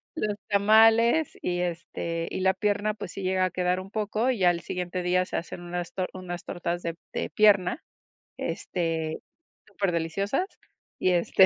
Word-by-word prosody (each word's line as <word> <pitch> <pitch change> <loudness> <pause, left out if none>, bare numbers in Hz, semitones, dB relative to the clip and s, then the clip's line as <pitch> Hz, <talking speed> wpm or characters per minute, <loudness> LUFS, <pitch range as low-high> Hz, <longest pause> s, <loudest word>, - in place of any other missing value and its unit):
los 210 -8 -1
tamales 225 +7 +5
y, 175 0 -1
este, 170 -1 -3
y - - -3
la 190 0 +3
pierna, 205 +1 0
pues, 205 -4 -7
sí 195 - -6
llega 185 0 +2
a 185 - -2
quedar 180 0 0
un 190 +1 -11
poco, 215 +3 0
y 205 -7 +1
al 175 -1 +3
siguiente 180 0 -3
día 180 +1 +2
se - - -6
hacen 175 - -4
unas 175 0 -4
tor 185 -1 -2
unas 180 -1 -6
tortas 175 -1 -3
de 170 -1 -3 0.2
de - - -2
pierna, 205 - +4 0.5
este, 165 -3 -2 0.5
superdeliciosas, 195 - -1 0.5
y, 185 - +2
este, 180 +2 +5
185 Hz, 160 wpm, -27 LUFS, 175-205 Hz, 0.5 s, tamales